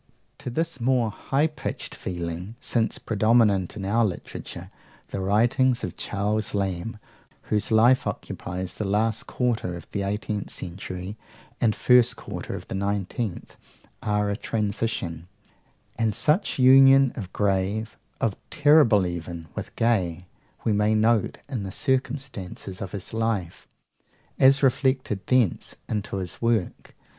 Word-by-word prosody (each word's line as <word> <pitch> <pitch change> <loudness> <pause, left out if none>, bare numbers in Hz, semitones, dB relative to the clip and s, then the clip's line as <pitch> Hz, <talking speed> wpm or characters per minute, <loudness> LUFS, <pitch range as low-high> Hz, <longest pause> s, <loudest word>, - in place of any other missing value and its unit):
To - - -5
this 165 +1 -2
more 120 -2 +2
high 135 +7 0
pitched 155 -1 -4
feeling, 90 +3 -5
since 115 -2 0
predominant 110 -4 +2
in 100 -3 -5
our 115 +4 +2
literature, 95 -6 -5 0.4
the - - -4
writings 120 +6 +2
of 90 - -4
Charles 105 +1 -1
Lamb, 100 +2 -2 0.5
whose 105 -1 +1
life 120 +4 +4
occupies 90 +1 -5
the - - -4
last 110 +3 +1
quarter 115 -8 -1
of 85 - -10
the 100 - -2
eighteenth 105 +1 -3
century 95 +2 -6 0.4
and 110 -2 +3
the - - -17
first 125 -1 +5
quarter - - -6
of - - -8
the - - -6
nineteenth, 100 +1 -3 0.4
are 105 -1 0
a - - -1
transition; 100 -6 -2 0.7
and 110 -3 +1
such 155 +7 +1
union 135 0 +7
of 95 -5 -6
grave, 100 +3 0 0.2
of 105 -4 0
terrible 145 -10 +5
even, 85 -2 -5
with - - -7
gay, 90 -7 +1 0.4
we 110 - +2
may 105 +1 +2
note 110 0 +2
in 130 -6 -3
the 95 -1 -5
circumstances 130 -8 -3
of 95 -2 -5
his 100 0 -6
life, 110 -6 -2 0.7
as 135 +1 +6
reflected 130 -6 +1
thence 125 -8 +1
into 105 -2 -3
his 90 -3 -5
work. 115 -5 -1
105 Hz, 135 wpm, -25 LUFS, 95-120 Hz, 0.7 s, union